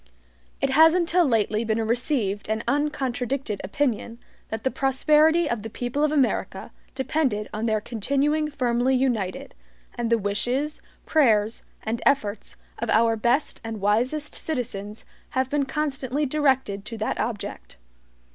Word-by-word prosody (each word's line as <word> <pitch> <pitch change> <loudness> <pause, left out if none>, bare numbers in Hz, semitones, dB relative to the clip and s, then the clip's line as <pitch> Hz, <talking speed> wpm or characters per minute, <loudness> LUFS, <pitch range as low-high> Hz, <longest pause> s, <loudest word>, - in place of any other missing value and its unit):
It 270 - +1
has 320 +4 +6
until 355 0 +3
lately 220 -3 +1
been 220 -1 0
a 225 - 0
received 225 -4 -1
and 220 +1 -1
uncontradicted 270 -5 -1
opinion 235 +1 -1 0.3
that 220 0 -4
the 265 - +1
prosperity 305 +5 +3
of 235 -6 -2
the 225 - -6
people 245 +6 -2
of 305 - +2
America 280 -5 0 0.2
depended 265 -6 0
on 215 +2 -2
their 215 -2 +1
continuing 280 +8 0
firmly 255 -2 +1
united, 235 -8 -1 0.4
and 235 -1 -2
the 230 - +4
wishes, 245 +9 -1 0.2
prayers, 225 -8 +3 0.2
and 225 +2 -2
efforts 215 -7 0 0.2
of 235 - -3
our 225 +1 +4
best 240 +6 0
and 225 -1 -5
wisest 245 +9 0
citizens 225 -8 -4 0.3
have 260 0 +1
been 290 -1 +1
constantly 280 -1 -1
directed 265 -8 +1
to 230 +1 -6
that 215 - -2
object. 210 - -4
245 Hz, 140 wpm, -25 LUFS, 220-285 Hz, 0.4 s, has